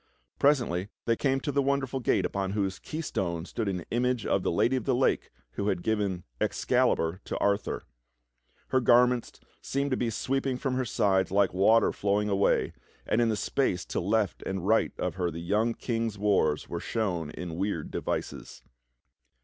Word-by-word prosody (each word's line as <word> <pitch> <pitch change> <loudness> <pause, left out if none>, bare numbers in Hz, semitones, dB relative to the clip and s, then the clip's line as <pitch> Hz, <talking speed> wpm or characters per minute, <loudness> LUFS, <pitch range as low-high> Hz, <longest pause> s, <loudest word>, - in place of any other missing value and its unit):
Presently 120 -10 +2 0.2
they 115 - +2
came 135 +2 +1
to 145 - -2
the 140 0 +2
wonderful 135 -1 0
gate 105 -6 +1
upon 100 0 -2
whose 95 -2 -1
keystone 90 - -3
stood 110 +2 -3
an 90 -3 -3
image 125 -1 0
of 95 - +1
the - - 0
Lad}' 120 +9 +2
of 130 -4 -1
the - - +2
Lake - - +1 0.2
who 100 - -3
had 90 - 0
given 100 -5 -1 0.2
Excalibur 80 +4 +1
to - - -3
Arthur. 100 0 0 0.9
Her 130 - +2
gar 120 +1 +6
ments 125 -1 -3 0.2
seemed 140 +1 -1
to 130 - +1
be 120 - 0
sweeping 135 +3 -1
from 130 0 -2
her 130 0 0
sides 95 -4 +2
like 100 -1 +2
water 110 +5 +4
flowing 105 +1 0
away, 100 0 +2 0.3
and 115 - +2
in 115 - +3
the 110 - +1
space 100 -5 0
to - - -2
left 100 -1 0
and 95 -1 -4
right 110 +2 +3
of - - -2
her 90 -2 0
the 80 - -7
young 105 +7 0
King's 115 -3 -2
wars 95 -7 +1
were 85 - -4
shown 90 -7 -2
in 85 +1 -6
weird 95 -5 -2
devices. - - -4
105 Hz, 180 wpm, -28 LUFS, 95-125 Hz, 0.9 s, gar